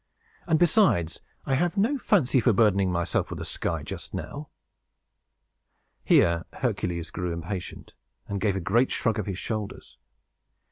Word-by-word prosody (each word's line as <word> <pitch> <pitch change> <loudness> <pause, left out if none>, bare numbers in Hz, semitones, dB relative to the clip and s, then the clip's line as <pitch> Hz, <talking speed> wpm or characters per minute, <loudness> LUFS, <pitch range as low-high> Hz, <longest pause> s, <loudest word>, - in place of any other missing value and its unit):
And, 160 -2 +3
besides, 155 - +3 0.2
I 135 - 0
have 175 +7 +1
no 245 +8 +2
fancy 145 - +3
for 120 -1 +3
burdening 100 -3 +3
myself 85 0 -1
with - - -5
the - - -5
sky, - - -3
just - - -7
now." 145 0 -6 1.5
Here 85 -1 +4
Hercules 85 -2 -2
grew 90 -1 -3
impatient, 85 +3 -6 0.3
and 100 -1 -3
gave 100 -2 +1
a - - -1
great 115 +9 +2
shrug 110 -3 0
of 105 - -3
his 95 -3 -3
shoulders. 105 -1 -5
105 Hz, 145 wpm, -26 LUFS, 90-140 Hz, 1.5 s, Here